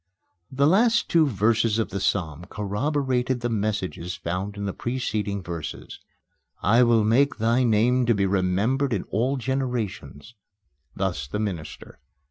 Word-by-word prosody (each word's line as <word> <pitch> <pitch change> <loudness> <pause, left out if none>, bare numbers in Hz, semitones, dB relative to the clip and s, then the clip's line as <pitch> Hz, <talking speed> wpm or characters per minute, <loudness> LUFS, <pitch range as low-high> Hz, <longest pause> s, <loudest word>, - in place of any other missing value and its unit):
The 135 +1 +2
last 230 +8 +3
two 165 -2 +5
verses 110 -1 +2
of 115 - -1
the 100 - -3
psalm 85 -4 -1
corroborated 125 - -1
the 120 - -1
messages 100 -5 -2
found 95 +4 -4
in 100 - -4
the 100 - -2
preceding 105 -5 -3
verses: 85 -3 -7 0.6
"I 115 +6 +5
will 115 -3 +4
make 125 +7 +3
thy 115 +3 +2
name 120 +2 +2
to 115 - +4
be 100 -1 +1
remembered 100 +8 +1
in 100 - -1
all 125 +6 0
generations:" 120 - -3 0.6
thus 90 -9 -2
the 70 - -4
minister. 85 -11 -5
110 Hz, 140 wpm, -24 LUFS, 95-125 Hz, 0.6 s, two